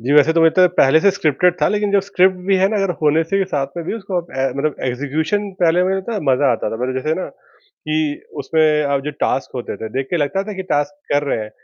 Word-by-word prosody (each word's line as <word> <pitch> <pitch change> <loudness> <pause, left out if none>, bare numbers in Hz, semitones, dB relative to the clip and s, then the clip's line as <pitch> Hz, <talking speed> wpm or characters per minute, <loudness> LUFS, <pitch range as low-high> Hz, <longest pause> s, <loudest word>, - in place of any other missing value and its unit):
जी, 125 +5 -1
वैसे 150 +2 +5
तो 165 - +2
वो 165 - +7
तो 185 -1 +7
पहले 135 +4 +5
से 200 - +4
स्क्रिप्टेड 180 -1 +1
था, - - +5
लेकिन 210 0 0
जो 200 - +4
स्क्रिप्ट 190 -1 +2
भी 195 -1 +3
है 190 +1 +3
ना 215 - -1
अगर 195 -2 0
होने 155 +1 +3
से 195 +5 -1
ही 195 - +2
साथ 145 -7 -2
में 170 - -4
भी - - -2
उसको 195 -4 -5
अप 170 - -18
ए, 135 0 +1
मतलब 145 +1 -1
एक्जीक्यूशन 155 - -2
पहले 175 +1 +3
मुझे 190 +1 0
लगता 190 +5 -4
है, 210 - -2
मज़ा 135 +1 +3
आता 110 -2 -2
था - - -4
पहले 125 +2 -2
जैसे 155 +5 -1
ना - - -4
कि 155 - -5 0.2
उसमें 160 -1 +1 0.2
अब 140 -1 0
जो 150 - -2
टास्क 135 - 0
होते 125 - -5
थे 110 - -6
देख 135 - -2
के 175 - +1
लगता 150 +5 0
था 210 - -6
कि 190 - -3
टास्क 145 0 0 0.2
कर 145 0 +2
रहे - - 0
हैं 110 -1 -6
160 Hz, 275 wpm, -19 LUFS, 140-190 Hz, 0.2 s, वो